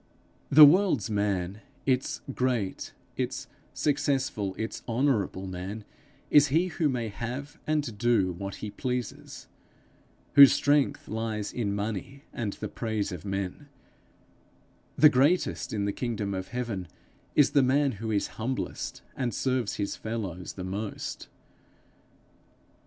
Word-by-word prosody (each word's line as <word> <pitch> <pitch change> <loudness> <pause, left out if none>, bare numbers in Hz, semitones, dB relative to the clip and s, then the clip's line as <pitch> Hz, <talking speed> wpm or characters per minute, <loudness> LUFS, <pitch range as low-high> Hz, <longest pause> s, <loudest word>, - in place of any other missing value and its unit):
The 150 +2 +11
world's 145 - +4
man, 100 -1 -1 0.2
its 130 -1 0
great, 125 -7 -1 0.3
its - - -2 0.3
successful, 135 -8 0
its 110 0 -4
honorable 115 -6 0
man, 95 +3 -6 0.5
is 145 -1 +7
he 165 +7 +2
who 160 -3 0
may 120 -4 -2
have 130 +8 -6
and 150 -7 0
do 115 -6 +3
what 100 +3 -6
he 105 - -5
pleases, 125 -1 -4 0.9
whose 140 -2 +10
strength 145 0 +2
lies 110 -1 -3
in 105 -5 -1
money 110 +7 -4
and 110 -4 -3
the - - -5
praise 110 -3 -2
of 90 +1 -7
men; 100 +8 -4 1.3
the 155 - +9
greatest 145 +6 +2
in 105 -2 -1
the 100 - -1
kingdom 110 -5 -2
of 95 -1 -4
heaven 115 -7 -4 0.5
is 145 - +5
the 140 - +5
man 135 +2 +3
who 110 0 -5
is 105 -2 +1 0.2
humblest 130 +4 -3
and 120 -5 -2
serves 130 -5 0
his 100 -1 -2
fellows 100 -6 -5
the 95 - -7
most. 100 +3 -5
115 Hz, 130 wpm, -28 LUFS, 100-135 Hz, 1.3 s, The